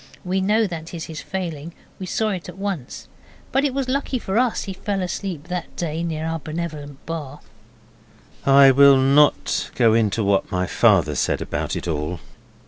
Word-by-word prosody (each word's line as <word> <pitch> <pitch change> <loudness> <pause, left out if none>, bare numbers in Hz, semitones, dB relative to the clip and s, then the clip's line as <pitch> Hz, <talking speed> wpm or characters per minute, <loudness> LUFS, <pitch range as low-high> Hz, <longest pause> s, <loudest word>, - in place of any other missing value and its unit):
We 190 +1 0
know 215 +4 +2
that 165 -2 -6
is 165 - -5
his 160 -1 -7
failing. 170 -4 -5 0.3
We 185 - -5
saw 220 +3 0
it 185 -4 -4
at - - -10
once. 195 -10 -5 0.4
But 270 - +2
it 285 - +1
was 270 0 -2
lucky 270 0 -1
for 210 -2 -1
us 250 -2 +1
he 195 - -5
fell 200 +1 -3
asleep 180 -3 -4
that 180 -1 -5
day 165 -1 -3
near 160 -2 -3
our 165 0 -2
benevolent 155 -3 -6
bar. 150 -4 -6 1.0
I 135 0 +7
will 140 +1 +7
not 140 +3 +3
go 115 -3 +4
into 110 -1 +1
what 100 -1 +1
my 90 0 0
father - - +3
said - - 0
about - - -3
it - - -5
all. 80 +2 -2
165 Hz, 180 wpm, -22 LUFS, 140-190 Hz, 1.0 s, I